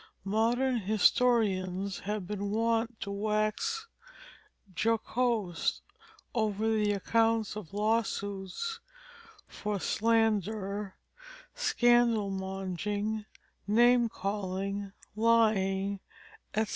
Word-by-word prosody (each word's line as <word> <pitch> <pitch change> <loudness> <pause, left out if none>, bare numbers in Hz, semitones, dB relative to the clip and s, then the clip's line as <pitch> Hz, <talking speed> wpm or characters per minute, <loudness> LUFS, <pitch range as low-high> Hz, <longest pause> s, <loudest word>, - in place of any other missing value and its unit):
Modern 235 +5 +1
historians 200 -3 +2
have 210 -1 -3
been 205 +1 -3
wont 225 +1 0
to 200 - -4
wax 215 - -1 0.9
jocose 225 -3 0 0.5
over 215 -2 0
the 210 -2 +2
accounts 225 +1 +1
of 210 -7 -8
law 215 +3 +2
suits 205 - -4 0.7
for 210 -1 -3
slander, 210 -2 0 0.6
scandal 240 - +3
monging, 195 +3 -3 0.4
name 240 +2 +5
calling, 195 0 -3 0.2
lying, 200 -3 +2 0.6
etc. 220 0 +1
215 Hz, 80 wpm, -30 LUFS, 200-230 Hz, 0.9 s, name